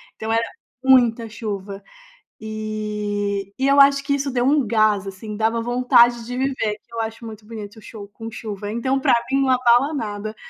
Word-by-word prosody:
Então 220 +1 -3
era 230 0 +1 0.4
muita 240 -3 +4
chuva. 200 -2 -6 0.6
E 210 -2 -3
e 265 - +2
eu 280 +1 +4
acho 280 0 +6
que 280 0 +1
isso 280 0 -2
deu 245 -1 0
um 285 0 +3
gás, 215 -2 +2
assim, 205 +2 -7
dava 225 +1 +1
vontade 240 -1 +3
de 245 +1 -5
viver. 260 -5 -1
Que 235 - -24
eu 230 - -4
acho 225 +1 -6
muito 220 -1 -10
bonito 215 -1 -9
o - - -12
show 210 -2 -10
com 225 +2 -9
chuva, 210 -3 -6
então 260 +4 0
pra - - +3 0.2
mim 270 - +2
não 270 - +1
abala 250 +3 +3
nada. 215 -4 -4
225 Hz, 190 wpm, -21 LUFS, 210-250 Hz, 0.6 s, acho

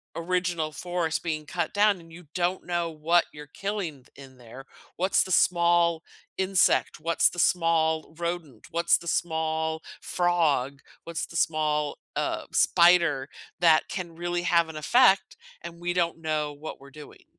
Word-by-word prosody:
original 175 -2 -1
forest 170 0 -2
being 155 -3 -3
cut 170 +2 -3
down, 205 -1 +3
and 165 -1 -16
you 175 +1 -13
don't 180 +1 -1
know 175 -1 -1
what 165 +2 +2
you're 150 0 -11
killing 180 -5 -5
th - - -23
in 135 -2 -14
there. 125 +2 -12 0.3
What's 185 +3 +2
the 190 - -7
small 170 -1 +3 0.4
insect, 190 -4 +2
what's 165 +2 +2
the 175 - -12
small 165 -3 +1
rodent, 170 -8 -5
what's 170 +1 +3
the 170 - -11
small 160 -1 -1 0.2
frog, 155 -7 0 0.2
what's 170 -1 -4
the - - -13
small, 150 -2 0 0.2
uh, - - -2
spider 170 -6 +4 0.3
that 165 -2 +4
can 175 -4 -6
really 175 +1 -2
have 170 -1 +3
an 160 - -9
effect, 195 - +3 0.2
and 170 0 -9
we 175 +1 -2
don't 170 -2 0
know 155 -2 -2
what 150 +2 -9
we're 140 - -13
doing. 150 +1 -14
165 Hz, 155 wpm, -26 LUFS, 155-175 Hz, 0.4 s, spider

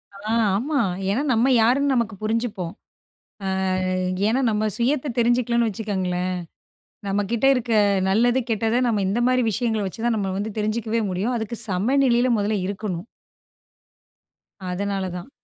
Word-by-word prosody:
ஆ, 210 +2 -5 0.3
ஆமா. 280 +6 -1 0.3
ஏனா 215 +7 +1
நம்ம 235 +3 +3
யாருன்னு 270 +5 +3
நமக்கு 230 -3 0
புரிஞ்சுப்போம். 215 -5 -2 0.7
ஆ - - -1 0.8
ஏனா, 245 +5 +2
நம்ம 215 0 0
சுயத்த 265 +4 0
தெரிஞ்சுக்கலன்னு 235 0 +2
வச்சுக்கங்களேன், 185 -4 -2 0.8
நம்ம 200 +1 0
கிட்ட 235 +3 +2
இருக்க 245 -2 -2 0.4
நல்லது, 235 +6 +3
கெட்டது 225 +2 +1
நம்ம 215 -4 +1
இந்த 210 +5 0
மாரி 255 0 +2
விஷயங்கள 220 0 -1
வச்சுதான் 225 +4 -1
நம்ம 195 -2 -1
வந்து 210 +2 -3
தெரிஞ்சுக்கவே 220 +1 -1
முடியும். 200 +7 -1
அதுக்கு 225 +1 -4
சம 200 +8 +1
நிலையில 245 0 +3
மொதல்ல 205 +1 0
இருக்கணும். 195 -2 -4 1.7
அதனால 195 0 -2
தான். 180 +8 -7
220 Hz, 130 wpm, -23 LUFS, 200-240 Hz, 1.7 s, நம்ம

